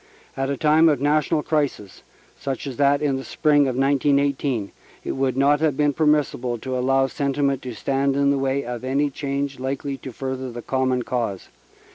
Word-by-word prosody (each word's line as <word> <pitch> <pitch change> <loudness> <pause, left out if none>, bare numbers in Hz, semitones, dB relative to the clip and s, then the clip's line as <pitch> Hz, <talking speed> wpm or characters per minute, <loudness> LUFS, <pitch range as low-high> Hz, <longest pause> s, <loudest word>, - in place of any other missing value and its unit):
At 135 0 -2
a 140 - -1
time 155 +3 +4
of 145 -4 +1
national 150 +2 +1
crisis, 145 - -2 0.3
such 135 -1 -4
as 135 -3 -6
that 140 +1 +3
in 140 -2 +1
the 135 - -6
spring 145 -2 +2
of 130 - -2
1918, 140 -4 +1 0.3
it - - -3
would 130 -1 -1
not 145 +2 +4
have 150 -4 +1
been 145 -1 +2
permissible 145 -5 +1
to 130 +3 -4
allow 135 +1 +2
sentiment 140 0 -1
to 125 -3 -7
stand 135 +2 0
in 140 0 +3
the 140 - +1
way 135 0 -1
of 120 0 -5
any 140 +3 0
change 140 -1 -3
likely 135 +1 -3
to 130 0 -8
further 130 +1 -5
the 120 0 -8
common 130 -1 0
cause. 115 -6 -3
135 Hz, 185 wpm, -23 LUFS, 130-145 Hz, 0.3 s, time